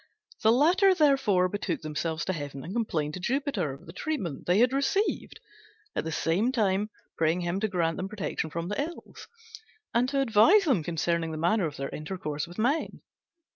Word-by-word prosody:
The 220 - +5
latter, 360 - +5
therefore, 270 - +3
betook 190 -2 -3
themselves 155 +1 -3
to 190 - -1
heaven 145 -4 -6
and 185 - -6
complained 160 -10 -1
to 185 - -5
Jupiter 240 - -1
of 135 - -11
the 165 - -11
treatment 195 - -4
they 180 +2 +4
had 245 +3 +4
received, 280 +10 0 0.6
at - - -1
the 160 - -3
same 190 +11 +1
time 210 -3 +1 0.3
praying 165 +2 +2
him 175 +2 -1
to 220 - 0
grant 170 -4 0
them 190 +1 -4
protection 195 -5 -3
from 170 +2 -4
the 205 +8 -1
Ills, 335 +4 -8 0.7
and 245 +2 +2
to 275 0 0
advise 270 - +5
them 265 - +2
concerning 170 +1 -1
the 160 - -5
manner 175 +3 +2
of 145 - -8
their 135 0 -3
intercourse 155 -2 -4
with 175 - -12
men. 270 +8 0
190 Hz, 185 wpm, -28 LUFS, 165-255 Hz, 0.7 s, The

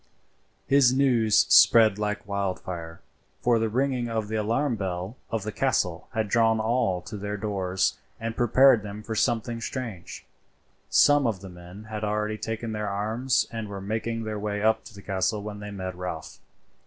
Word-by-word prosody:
His 135 -3 +5
news 125 -5 +3
spread 110 -3 +7
like 105 -1 -3
wildfire; 90 -4 -4 0.4
for 120 -2 +3
the 110 0 0
ringing 125 0 0
of 110 -2 -2
the 110 - -2
alarm 115 +5 0
bell 95 +1 -4
of 115 -3 -2
the 110 - -4
castle 100 -9 0
had 110 -1 0
drawn 115 +1 +3
all 110 -6 0
to 110 - -8
their 105 +1 -4
doors 95 -3 -1 0.2
and 115 0 -4
prepared 120 0 +5
them 105 +1 -8
for 110 - -4
something 115 0 0
strange. 115 -9 -6 0.6
Some 145 -3 +5
of 100 -5 -2
the 95 - -9
men 90 +3 -12
had 110 -1 -6
already 105 0 -1
taken 110 0 -4
their 105 -1 -3
arms 110 +6 0
and 110 -2 -5
were 100 -1 -6
making 110 +3 -3
their 110 -1 -4
way 105 0 -3
up 110 0 +2
to 100 - -12
the 100 - -12
castle 100 +2 -1
when 105 -1 -6
they 105 0 -7
met 95 -2 -5
Ralph. 90 -3 -6
110 Hz, 175 wpm, -26 LUFS, 100-115 Hz, 0.6 s, spread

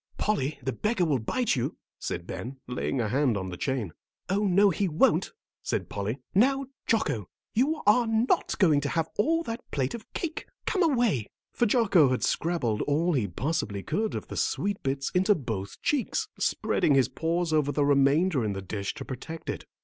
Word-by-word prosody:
"Polly, 155 -9 0
the 130 - -1
beggar 215 -4 0
will 145 -5 +1
bite 235 - 0
you," 120 - -2 0.2
said 85 - -4
Ben, 105 +10 -6
laying 125 +1 -2
a 115 - +1
hand 130 -2 +2
on 95 -1 -4
the 90 - -5
chain. 115 - -2 0.4
"Oh, 200 +2 +2
no, 195 +2 +5
he 195 +3 0
won't," 160 -2 +2 0.3
said - - -2
Polly. 105 +5 -3 0.2
"Now, 270 +7 +3 0.2
Jocko, 145 - 0 0.2
you 285 +7 +1
are 225 +3 +5
not 225 +2 +1
going 155 -7 +4
to 140 - -2
have 165 +1 -1
all 330 +9 +2
that 230 -4 -5
plate 135 -2 -1
of 230 -2 -9
cake. 325 -2 -4 0.2
Come 385 - 0
away," 240 - +2 0.3
for 240 - +2
Jocko 200 - +4
had 130 - 0
scrabbled 145 -11 0
all 165 +5 +2
he 120 -8 +1
possibly 100 - -2
could 210 +8 -1
of - - -5
the - - -7
sweet 200 0 -1
bits 135 0 -2
into 190 +3 +3
both 110 - -5
cheeks, 300 - 0
spreading 145 - +2
his 135 -2 +4
paws 165 0 -1
over 150 -2 +2
the 145 -1 +1
remainder 140 +2 +3
in 105 -2 -1
the 95 - -4
dish 100 +3 -4
to 135 -2 -7
protect 160 +5 -6
it. - - -7
155 Hz, 190 wpm, -28 LUFS, 125-210 Hz, 0.4 s, no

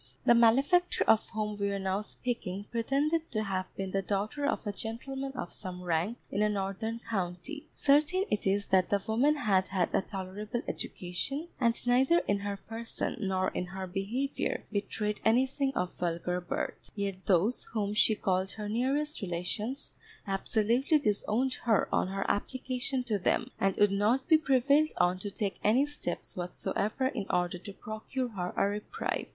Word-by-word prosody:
The - - +7
malefactor 270 +10 +4
of 220 0 +4
whom 210 -1 -3
we 200 0 +1
are 200 - -1
now 190 +1 -1
speaking 205 -4 -4
pretended 285 +8 0
to 215 -1 +1
have 190 -2 -2
been 195 -1 -3
the 195 - +1
daughter 210 +9 -1
of 285 - -1
a 205 - -1
gentleman 265 +6 -4
of 245 -9 -5
some 180 -1 -6
rank 175 +7 0
in 200 - 0
a 210 - +4
northern 205 +3 -2
county. 200 - -3
Certain 305 +7 +3
it 210 -2 +1
is 200 +1 +2
that 185 -1 +4
the 200 - +3
woman 255 +8 +3
had 195 -9 +2
had 185 -2 0
a - - +3
tolerable 205 +4 -5
education, 265 - -3
and 235 -2 +1
neither 260 +7 +5
in 200 0 +2
her 200 0 -3
person, 225 +3 -4
nor 190 -2 +1
in 180 - -3
her 190 +1 -5
behaviour 210 +10 -2
betrayed 210 +1 -2
anything 265 +4 +3
of 180 0 -1
vulgar 180 +1 -1
birth. 175 - -4
Yet 195 -2 -3
those 195 +6 +3
whom 205 -2 0
she 215 +1 +4
called 190 -1 0
her 210 -1 -5
nearest 270 +7 0
relations 205 +9 -3 0.3
absolutely 225 +8 +2
disowned 240 0 +1
her 220 -4 +3
on - - +2
her 195 +1 -2
application 255 +3 -1
to 220 -5 0
them, 180 - +1
and 195 -1 +2
would 205 -1 +4
not 215 +7 +2
be 315 -1 +6
prevailed 280 +1 +4
on 180 +1 +3
to 205 - -4
take 200 0 -3
any 240 +7 +4
steps 290 -12 -5
whatsoever 200 +7 -2
in 200 -8 -4
order 180 0 0
to 200 +3 -8
procure 220 +5 -4
her 180 -5 -3
a - - +4
reprieve. 205 +1 -3
210 Hz, 170 wpm, -31 LUFS, 190-255 Hz, 0.3 s, The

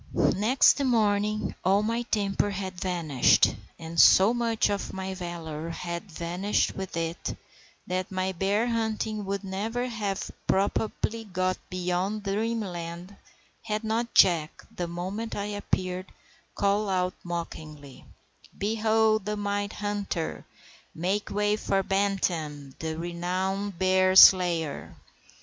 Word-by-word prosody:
Next 255 +7 +4
morning 215 -4 +1
all 195 +3 +3
my 230 +2 0
temper 205 -3 0
had 190 -2 -5
vanished, 165 -8 +3 0.2
and 165 0 -5
so 195 +5 +7
much 230 -2 +1
of 200 - -3
my 190 0 -4
valour 170 -3 -6
had 170 +3 -5
vanished 175 +5 -1
with 190 -3 -5
it 165 0 -3 0.5
that 185 +1 -3
my 185 0 -1
bear 195 +5 0
hunting 220 -2 -2
would 195 0 -3
never 215 +6 -2
have 210 -5 -3 0.2
probably 220 +3 0
got 185 -1 -1
beyond 185 +3 -2
dreamland 195 -4 -3 0.5
had 215 0 -3
not 230 +2 -2
Jack, 170 -5 +4
the 175 - -3
moment 185 +6 -4
I 200 - -2
appeared, 185 -3 -3 0.5
called 200 +1 +1
out 185 -1 0
mockingly,— 155 -5 -7 0.5
"Behold 220 0 +2
the 210 0 -2
mighty 205 0 -2
hunter! 205 -5 -3 0.5
Make 190 +5 -1
way 210 0 +1
for 195 -2 0
Bantam, 175 -8 -1
the 160 0 -4
renowned 185 +3 -2
bear 185 +1 +3
slayer." 175 -6 +6
195 Hz, 120 wpm, -27 LUFS, 175-210 Hz, 0.5 s, so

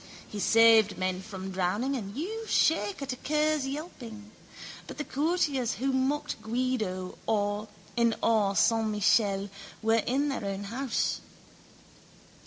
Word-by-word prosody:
He 210 - -6
saved 225 -1 +5
men 185 0 -1
from 190 -1 -7
drowning 195 +9 0
and 205 -4 -5
you 440 - -4
shake 210 -4 +2
at 270 -2 -3
a - - -5
cur's 300 +1 0
yelping. 240 -8 -7 0.6
But - - -8
the 300 - -2
courtiers 290 -5 0
who 270 +1 -1
mocked 260 -2 -1
Guido 220 -6 -2 0.8
in 235 -1 +3
Or 210 -3 +3
san 225 0 +3
Michele 205 -1 +2 0.3
were 225 0 +3
in 280 +4 0
their 270 - -3
own 200 0 -3
house. 235 +5 -1
230 Hz, 130 wpm, -29 LUFS, 205-275 Hz, 0.8 s, saved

